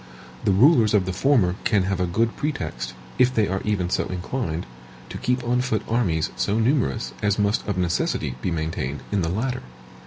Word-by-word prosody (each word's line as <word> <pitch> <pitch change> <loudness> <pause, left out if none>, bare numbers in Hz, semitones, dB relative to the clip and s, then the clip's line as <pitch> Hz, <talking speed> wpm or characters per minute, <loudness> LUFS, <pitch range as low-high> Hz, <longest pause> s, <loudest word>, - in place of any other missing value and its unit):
The - - +4
rulers 110 - +5
of 95 -3 +3
the 95 - -2
former 95 -5 +2
can 105 -4 +2
have 95 0 -1
no 90 - +1
good 115 +6 0
pretext, 90 - -3 0.2
if 125 0 +5
they 110 -5 +2
are 95 +1 -2
even 95 -4 -1
so - - +1
inclined, 90 -1 -3 0.4
to - - -6
keep 125 0 0
on 125 +1 +1
foot 110 -4 -1
armies 90 -10 +1
so 105 - 0
numerous 120 -1 +1
as 105 -1 +1
must 105 +1 +1
of 100 -3 -1
necessity 90 -7 0
be - - -1
maintained 80 -4 -3
in 100 -2 +1
the 80 - 0
latter. 125 +8 -2
105 Hz, 190 wpm, -24 LUFS, 90-120 Hz, 0.4 s, rulers